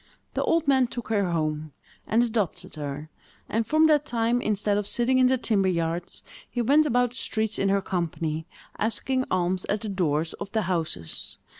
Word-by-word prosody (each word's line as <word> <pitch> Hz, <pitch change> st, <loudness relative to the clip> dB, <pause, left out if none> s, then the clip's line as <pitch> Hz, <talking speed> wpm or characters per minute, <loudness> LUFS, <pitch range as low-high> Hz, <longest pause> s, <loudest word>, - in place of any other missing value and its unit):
The -, -, -1 dB
old 330 Hz, -2 st, +1 dB
man 265 Hz, -2 st, +4 dB
took 240 Hz, -1 st, -7 dB
her 200 Hz, -4 st, +1 dB
home, 155 Hz, -2 st, -2 dB, 0.3 s
and 230 Hz, +2 st, +3 dB
adopted 220 Hz, -6 st, -2 dB
her; 150 Hz, +1 st, -6 dB, 0.4 s
and, 225 Hz, +1 st, -1 dB
from 310 Hz, +1 st, +4 dB
that 300 Hz, -2 st, +4 dB
time, 235 Hz, -2 st, 0 dB
instead 210 Hz, -1 st, +1 dB
of 205 Hz, -1 st, -1 dB
sitting 255 Hz, +3 st, +2 dB
in 255 Hz, -, +6 dB
the 260 Hz, +1 st, +3 dB
timber 210 Hz, -5 st, +1 dB
yards, 170 Hz, -1 st, -2 dB, 0.3 s
he 245 Hz, -, -1 dB
went 295 Hz, +6 st, +4 dB
about 245 Hz, -2 st, +2 dB
the 245 Hz, -, -9 dB
streets 220 Hz, -3 st, -2 dB
in 195 Hz, -, +2 dB
her 195 Hz, 0 st, +2 dB
company, 165 Hz, -3 st, -2 dB, 0.3 s
asking 255 Hz, +5 st, 0 dB
alms 185 Hz, 0 st, 0 dB
at 205 Hz, 0 st, -1 dB
the 215 Hz, -, -4 dB
doors 165 Hz, -4 st, 0 dB
of 195 Hz, -, -7 dB
the 220 Hz, -1 st, +1 dB
houses. 160 Hz, -, -1 dB
205 Hz, 185 wpm, -26 LUFS, 170-240 Hz, 0.4 s, in